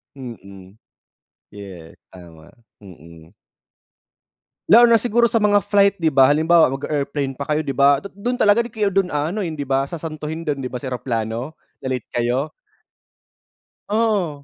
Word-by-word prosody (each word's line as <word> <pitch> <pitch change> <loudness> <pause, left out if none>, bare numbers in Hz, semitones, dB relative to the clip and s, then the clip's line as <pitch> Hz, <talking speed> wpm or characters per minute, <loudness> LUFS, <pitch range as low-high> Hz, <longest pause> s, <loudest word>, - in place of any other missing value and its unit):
Mm, 100 -6 -12 0.7
yes 95 -5 -11 0.2
tama, 85 -3 -15 0.3
mm. 85 -3 -15 1.4
Lalo 235 +1 +7
na 230 - +6
siguro 235 0 +1
sa 230 - +2
mga 205 -2 +3
flight, 200 -1 +3
di 165 -4 0
ba? 135 -1 +5
Halimbawa 160 +3 +4
mag-a-airplane 140 0 -3
pa 140 - -5
kayo, 155 +1 0
di 140 - -3
ba? 140 +1 +3
Du 200 - -9
dun 240 +6 -3
talaga 210 -1 +3
kayo 210 -4 -1
dun 195 -1 +1
ano, 155 +6 -2
hindi 160 -7 -4
di - - -13
ba 135 0 0
sasantuhin 160 0 -6
dun 150 -4 -3
di 130 - -4
ba, 125 - -9
sa 130 +1 -5
eroplano 120 +3 -4 0.2
na - - -6
late 130 -3 -4
kayo. 120 +4 -1 1.4
Oo, 205 -9 0
145 Hz, 155 wpm, -20 LUFS, 125-195 Hz, 1.4 s, Lalo